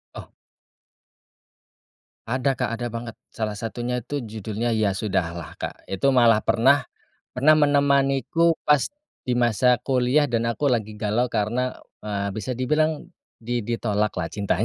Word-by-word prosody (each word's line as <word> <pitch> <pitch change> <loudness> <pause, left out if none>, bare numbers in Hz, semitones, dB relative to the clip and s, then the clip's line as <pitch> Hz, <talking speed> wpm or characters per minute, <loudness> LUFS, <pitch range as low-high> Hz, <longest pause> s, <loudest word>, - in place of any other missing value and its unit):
Oh. - - -8 2.0
Ada 130 +2 0
Kak, - - 0
ada 120 +1 -4
banget. 115 0 -6 0.2
Salah 110 -2 -3
satunya 120 +3 -3
itu 145 +4 -3
judulnya 110 0 -3
Ya 105 -2 +2
Sudahlah, 90 -5 -3
Kak. - - -7
Itu 115 +8 +1
malah 115 -4 +4
pernah 135 +4 +4 0.5
pernah 140 +5 +5
menemaniku 145 +1 +3
pas 150 -2 +3 0.4
di 125 - +1
masa 125 +1 +3
kuliah 130 +2 +2
dan 115 -4 0
aku 135 +4 0
lagi 110 -3 -1
galau 110 +3 0
karena, 120 +3 -1 0.2
eee, 100 -1 -3
bisa 110 +5 -4
dibilang 155 +6 0 0.3
di 120 +1 -2
di 120 - 0
tolak 105 -1 0
lah 85 - -1
cintanya 100 -1 -1
120 Hz, 140 wpm, -24 LUFS, 105-135 Hz, 2.0 s, pernah